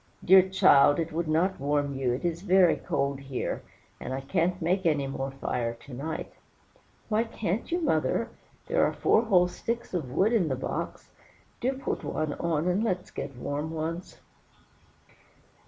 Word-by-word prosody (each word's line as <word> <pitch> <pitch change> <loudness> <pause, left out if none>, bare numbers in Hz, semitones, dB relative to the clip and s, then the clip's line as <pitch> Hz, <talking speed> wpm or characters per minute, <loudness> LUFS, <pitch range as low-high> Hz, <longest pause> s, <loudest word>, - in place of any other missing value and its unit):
"Dear 190 +1 +7
child, 145 -6 +6
it 165 -1 -2
would 165 +1 -2
not 170 +5 +1
warm 145 0 0
you; 135 -2 0
it 125 +7 -3
is 170 0 -1
very 185 -2 +5
cold 140 0 -1
here, 135 -2 -4 0.4
and 130 - -4
I 135 - -4
can't 175 +5 0
make 180 +3 0
any 150 -4 +2
more 135 0 -3
fire 120 -3 -3
to 135 +3 -14
night." 150 +6 -5 0.7
"Why 220 +1 +2
can't 225 - -3
you, 345 - +1
mother? 230 - +1 0.4
There - - +2
are - - +2
four - - +3
whole 180 -5 +4
sticks 230 +6 -4
of 160 -8 -2
wood 195 - +2
in 200 -8 +3
the 135 - 0
box; 130 - -5 0.5
do 260 +2 0
put 270 - -4
one 155 -2 -2
on, 165 0 -1
and 185 +4 +1
let's 185 -5 -2
get 135 -3 -6
warm 145 +5 -3
once." 165 +2 -5
165 Hz, 170 wpm, -28 LUFS, 140-190 Hz, 0.7 s, Dear